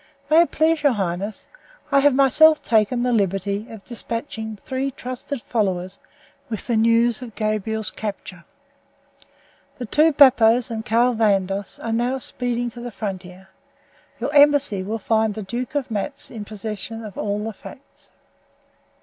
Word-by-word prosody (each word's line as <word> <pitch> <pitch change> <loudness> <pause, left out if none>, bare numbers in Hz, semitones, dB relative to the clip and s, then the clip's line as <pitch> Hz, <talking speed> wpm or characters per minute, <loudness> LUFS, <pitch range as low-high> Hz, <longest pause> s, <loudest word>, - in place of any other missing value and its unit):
May 320 +2 +7
it 340 - +2
please 320 0 +2
your 285 -3 +3
highness, 195 +1 -3 0.5
I 280 - +5
have 280 -1 +4
myself 300 +4 +6
taken 230 +2 +2
the 250 - +1
liberty 200 0 -1
of 220 -3 -10
despatching 225 -2 -6
three 260 +6 -3
trusted 255 0 -6
followers 190 -4 -2 0.5
with 220 -3 -5
the 240 - 0
news 230 +1 +3
of 235 -4 -9
Gabriel's 215 0 -1
capture. 195 -4 -7 1.3
The 250 - -5
two 305 +8 +3
Bappos 250 -4 +5
and 220 -1 -4
Carl 235 +3 +2
Vandos 200 -3 0
are 230 - -2
now 245 +3 0
speeding 245 -2 -2
to 240 - -10
the 245 - -5
frontier. 190 -3 -7 0.7
Your 285 - -3
embassy 285 -8 +4
will 210 +4 -3
find 220 0 0
the 215 - -5
Duke 240 +7 -5
of 270 -4 -2
Matz 225 +7 -4
in 215 -3 -7
possession 220 +2 -6
of 205 - -9
all 205 0 -2
the 220 0 -4
facts." 265 +7 -14
225 Hz, 150 wpm, -22 LUFS, 205-250 Hz, 1.3 s, May